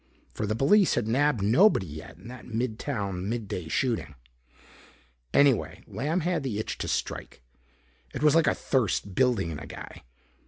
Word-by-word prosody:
For 105 - -3
the 110 - 0
police 175 - +4
had 120 -3 0
nabbed 130 -2 +2
nobody 120 - +4
yet 80 0 -10
in 95 +5 -13
that 125 +1 -10
mid 115 -1 -2
town 100 -8 -3
mid 115 -2 -3
day 90 -3 -5
shooting. 110 - -1 1.2
Anyway, 140 -4 +3
Lamb 155 +7 -2
had 175 0 0
the 130 -7 -3
itch 110 - -4
to - - -3
strike. - - -4 0.7
It 140 - -5
was 150 -2 +6
like 165 0 +4
a - - +3
thirst 110 -6 0
building 115 -8 +2
in 75 - -5
a 75 - -9
guy. - - -9
115 Hz, 170 wpm, -27 LUFS, 100-140 Hz, 1.2 s, was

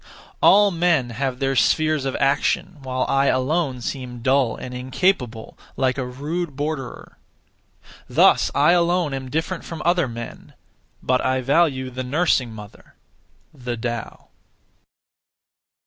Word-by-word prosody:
All 205 0 +6
men 165 -8 +1
have 130 +2 -2
their 135 0 -1
spheres 155 +1 +2
of 135 - -2
action, 140 +5 0
while 130 -1 -2
I 135 0 +2
alone 130 0 0
seem 125 -2 -6
dull 130 -3 +2
and 125 - -8
incapable, 125 - -1 0.2
like 130 0 +1
a 130 - -2
rude 150 +5 -4
borderer. 145 -2 -5 0.9
(Thus) - - +4
I 145 +4 +5
alone 175 -3 +2
am 135 -1 -5
different 160 +5 -3
from 165 - -7
other 175 -3 +2
men, 115 0 -9 0.5
but 130 0 +1
I 130 0 +1
value 135 -2 +1
the 130 +1 -4
nursing 135 -3 +1
mother 105 -2 -13 0.6
(the 125 -4 -5
Tao). 120 0 -5
135 Hz, 130 wpm, -22 LUFS, 125-160 Hz, 0.9 s, All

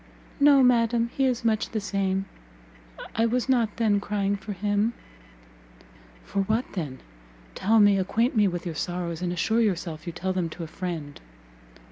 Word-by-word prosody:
"No, 280 -1 +6
madam, 235 -1 +3
he 270 - +2
is 250 -2 0
much 220 -1 +1
the 220 - -2
same; 195 -1 -1 0.9
I 225 +1 +3
was 245 +2 0
not 235 -5 +1
then 215 -3 +2
crying 200 -1 -1
for 200 +1 -7
him." 205 +3 0 1.3
"For - - -3
what 220 +5 0
then? 145 -9 -5 0.5
tell 220 +3 +3
me, 205 -1 +5
acquaint 230 +7 0
me 210 -2 +4
with 175 0 -3
your 170 - -3
sorrows, 175 0 -3
and 180 -1 -1
assure 220 +6 +1
yourself 170 -6 -2
you - - -2
tell 185 +2 -2
them 180 -3 -1
to 165 - -7
a - - -6
friend." 165 -4 -6
205 Hz, 165 wpm, -26 LUFS, 180-230 Hz, 1.3 s, No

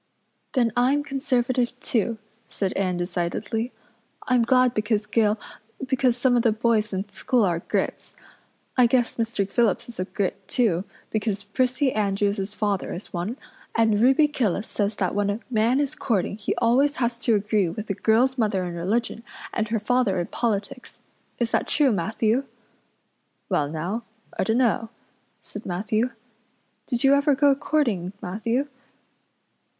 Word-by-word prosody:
"Then 235 -4 +2
I'm 265 +4 +3
Conservative 255 -3 0
too," 230 -1 0 0.3
said 195 -2 -2
Anne 185 -2 0
decidedly. 180 +7 -2 0.6
"I'm 250 -1 +4
glad 255 +1 +4
because 215 -1 0
Gil 210 0 +2 0.5
because 255 -2 +1
some 245 0 +3
of 240 - +4
the 230 - +3
boys 215 -1 +1
in 190 +1 -3
school 245 +2 +1
are 170 -3 0
Grits. - - -3 0.6
I 250 -2 +6
guess 245 0 +1
Mr. 225 -4 -1
Phillips 220 0 +1
is 235 -4 -10
a 185 - 0
Grit 195 -2 -3
too 205 -6 +1 0.3
because 210 -2 -1
Prissy 255 +5 0
Andrews's 200 -1 0
father 205 -3 -1
is 180 - -10
one, 185 +8 -3 0.4
and 220 -2 +3
Ruby 270 +5 +5
Gillis 220 - -1
says 205 0 -1
that 185 -3 -1
when 205 0 +1
a 205 +2 -1
man 230 +3 +3
is 285 -2 0
courting 200 -5 -1
he 210 - -2
always 260 +5 +3
has 235 -2 -1
to 235 -2 +2
agree 205 -2 +1
with 205 +6 -5
the 200 - -2
girl's 245 +6 +2
mother 205 -4 +1
in 175 - -4
religion 215 +7 -1 0.3
and 225 -1 0
her 225 +1 0
father 210 -3 +1
in 175 - -1
politics. 225 +2 -3 0.4
Is 235 -1 -1
that - - +1
true, 290 -3 +3
Matthew?" 220 +6 0 1.0
"Well 145 -1 +1
now, 180 +9 -3 0.3
I - - 0
dunno," 230 0 +1 0.5
said 210 - -8
Matthew. 215 +6 -1 0.8
"Did 245 -1 -1
you 270 0 +6
ever 280 0 +3
go 285 0 +5
courting, 235 - 0
Matthew?" 230 +9 -1
225 Hz, 155 wpm, -24 LUFS, 200-250 Hz, 1.0 s, I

